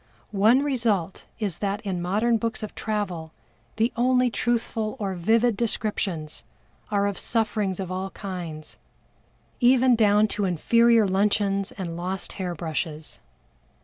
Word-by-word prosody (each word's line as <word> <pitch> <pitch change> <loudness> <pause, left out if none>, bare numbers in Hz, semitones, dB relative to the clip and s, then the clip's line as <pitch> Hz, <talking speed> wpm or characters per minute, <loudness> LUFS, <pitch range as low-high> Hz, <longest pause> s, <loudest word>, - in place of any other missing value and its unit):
One 220 +7 +4
result 225 - -1
is 200 -6 -3
that 200 0 -1
in 190 -5 -3
modern 215 +6 +1
books 230 0 -3
of 215 - -6
travel 185 -7 -3 0.4
the 225 +2 +1
only 250 0 +3
truthful 225 -2 -1
or 195 -3 -2
vivid 220 +6 +2
descriptions 200 -8 -2 0.5
are 200 -1 +1
of 200 -1 -2
sufferings 210 -4 -1
of 185 -2 -4
all 190 +1 -3
kinds, 175 -6 -7 0.8
even 250 0 +5
down 210 -1 +4
to 205 - 0
inferior 230 +5 +4
luncheons 195 0 +1
and 175 -4 -5
lost 185 +3 -4
hair 180 -2 -3
brushes. 155 -1 -4
205 Hz, 130 wpm, -25 LUFS, 185-230 Hz, 0.8 s, even